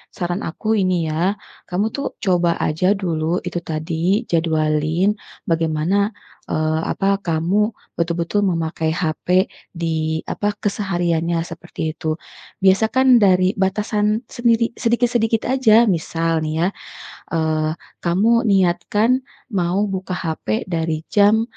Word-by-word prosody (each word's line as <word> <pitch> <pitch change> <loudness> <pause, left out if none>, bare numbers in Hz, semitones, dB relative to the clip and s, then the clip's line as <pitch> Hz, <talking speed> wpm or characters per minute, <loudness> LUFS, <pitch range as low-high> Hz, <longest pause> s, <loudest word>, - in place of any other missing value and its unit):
saran 175 0 -2
aku 170 +7 -7
ini 185 -1 +2 0.2
ya, 175 +6 +1 0.3
kamu 185 +3 0
tuh 280 - -3 0.2
coba 175 -4 +2
aja 170 +5 +2
dulu 170 -2 -1
itu 175 0 -2
tadi, 165 +7 0
jadwalin 160 +2 +1 0.4
bagaimana, 165 +6 +1 0.4
eee, 155 0 0
apa 195 0 +1
kamu 165 +5 +1 0.4
betul-betul 170 +3 0
memakai 160 -2 -1
HP 160 -3 -3 0.5
di 160 -1 -1
apa, 205 0 -1
kesehariannya 175 -5 0
seperti 170 +1 -9
itu. 155 0 -3 0.5
Biasa 195 +3 +5
kan 260 0 +4
dari 185 -2 +4
batasan 210 +2 +1
sendiri 230 -1 +2
sedikit-sedikit 235 -1 +1
aja, 235 -4 +5
misal 165 -2 0
nih 155 - -2
ya, - - +3 0.7
eee, 155 -1 +1 0.3
kamu 185 +6 +2 0.2
niatkan 195 +3 +2 0.4
mau 185 0 +1
buka 190 -1 -4
HP 160 -11 -2
dari 160 -2 -1
jam, 210 +2 +4
175 Hz, 115 wpm, -20 LUFS, 160-205 Hz, 0.7 s, Biasa